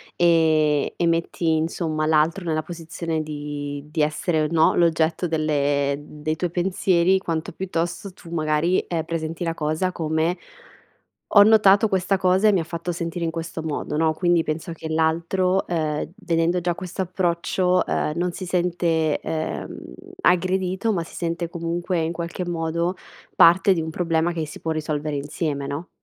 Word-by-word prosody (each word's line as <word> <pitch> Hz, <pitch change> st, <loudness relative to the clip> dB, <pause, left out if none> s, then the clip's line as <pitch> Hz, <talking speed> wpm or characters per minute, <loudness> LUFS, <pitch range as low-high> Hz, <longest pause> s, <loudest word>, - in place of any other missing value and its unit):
ehm, 160 Hz, -3 st, +3 dB
e 170 Hz, -, 0 dB
metti 165 Hz, 0 st, 0 dB
insomma 155 Hz, -1 st, -1 dB
l'altro 160 Hz, +4 st, +2 dB
nella 155 Hz, -2 st, -1 dB
posizione 165 Hz, -1 st, -4 dB
di 145 Hz, -1 st, -5 dB
di 160 Hz, -1 st, 0 dB
essere 155 Hz, +2 st, +1 dB
o, 155 Hz, -, +1 dB
no, 160 Hz, -1 st, +4 dB
l'oggetto 165 Hz, 0 st, +2 dB
delle 145 Hz, -3 st, +1 dB
dei 150 Hz, +1 st, -4 dB
tuoi 175 Hz, +1 st, -2 dB
pensieri 185 Hz, +1 st, +2 dB
quanto 165 Hz, -3 st, -3 dB
piuttosto 175 Hz, +1 st, -3 dB
tu 170 Hz, -3 st, -14 dB
magari, 155 Hz, +2 st, +1 dB
ehm, 165 Hz, -2 st, -3 dB
presenti 165 Hz, +1 st, -3 dB
la 165 Hz, -1 st, -1 dB
cosa 155 Hz, +4 st, -1 dB
come: 160 Hz, +1 st, -1 dB, 1.0 s
"Ho 205 Hz, -, +9 dB
notato 210 Hz, -1 st, +6 dB
questa 190 Hz, 0 st, +1 dB
cosa 190 Hz, +3 st, +3 dB
e -, -, +5 dB
mi 185 Hz, -, +2 dB
ha -, -, -3 dB
fatto 170 Hz, +1 st, -5 dB
sentire 170 Hz, 0 st, -4 dB
in 165 Hz, -, 0 dB
questo 165 Hz, 0 st, -5 dB
modo," 150 Hz, -1 st, -3 dB
no, 160 Hz, -1 st, +2 dB
quindi 175 Hz, -1 st, +2 dB
penso 160 Hz, +2 st, -3 dB
che 160 Hz, -1 st, -7 dB
l'altro, 170 Hz, +4 st, +1 dB
ehm, 155 Hz, -3 st, -2 dB
vedendo 170 Hz, +1 st, 0 dB
già 175 Hz, 0 st, -1 dB
quest'approccio, 180 Hz, 0 st, 0 dB
ehm, 150 Hz, -, 0 dB
non 175 Hz, 0 st, 0 dB
si 185 Hz, 0 st, -6 dB
sente, 170 Hz, -3 st, 0 dB
ehm, 160 Hz, -1 st, -4 dB, 0.4 s
aggredito 185 Hz, +3 st, +1 dB
ma 170 Hz, -4 st, -1 dB
si -, -, -14 dB
sente, 170 Hz, 0 st, -2 dB
comunque 170 Hz, +1 st, -2 dB
in 160 Hz, +1 st, -1 dB
qualche 170 Hz, +1 st, -4 dB
modo, 170 Hz, +1 st, -1 dB, 0.4 s
parte 190 Hz, +3 st, +6 dB
di 165 Hz, -, -1 dB
un 160 Hz, -, -4 dB
problema 165 Hz, 0 st, 0 dB
che 160 Hz, -2 st, -3 dB
si 145 Hz, -, -10 dB
può 160 Hz, -, -3 dB
risolvere 150 Hz, -1 st, -2 dB
insieme, 140 Hz, 0 st, -3 dB
no? 145 Hz, +6 st, -5 dB
165 Hz, 160 wpm, -23 LUFS, 155-175 Hz, 1.0 s, Ho